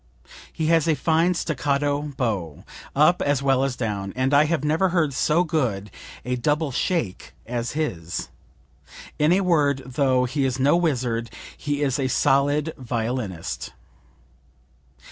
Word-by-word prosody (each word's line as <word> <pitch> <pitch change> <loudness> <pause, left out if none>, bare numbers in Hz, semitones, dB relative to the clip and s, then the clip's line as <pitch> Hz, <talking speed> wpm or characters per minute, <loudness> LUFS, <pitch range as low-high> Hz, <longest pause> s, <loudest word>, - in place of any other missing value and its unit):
He 160 - -3
has 165 0 +3
a 160 - +3
fine 165 +4 +2
staccato 145 -2 0 0.2
bow, 95 - -2 0.3
up 155 +5 +4
as 145 -1 +1
well 135 -1 +3
as 135 -2 -1
down; 100 -5 -3
and 130 +2 0
I 145 +2 +6
have 155 -2 -1
never 160 +5 +2
heard 165 -5 +1
so 155 +6 +2
good 120 - -1 0.3
a 125 0 -1
double 150 +4 0
shake 135 - -2
as 120 0 -3
his. 90 - -3 0.9
In 150 +2 +4
a 190 +2 +4
word, 145 -7 +2
though 130 -1 +1
he 135 +3 -1
is 135 0 -1
no 140 +5 +4
wizard 125 -9 0 0.3
he 145 0 -2
is 135 -1 0
a 135 - +1
solid 145 +4 +2
violinist." 115 -7 -4
140 Hz, 145 wpm, -23 LUFS, 125-155 Hz, 0.9 s, I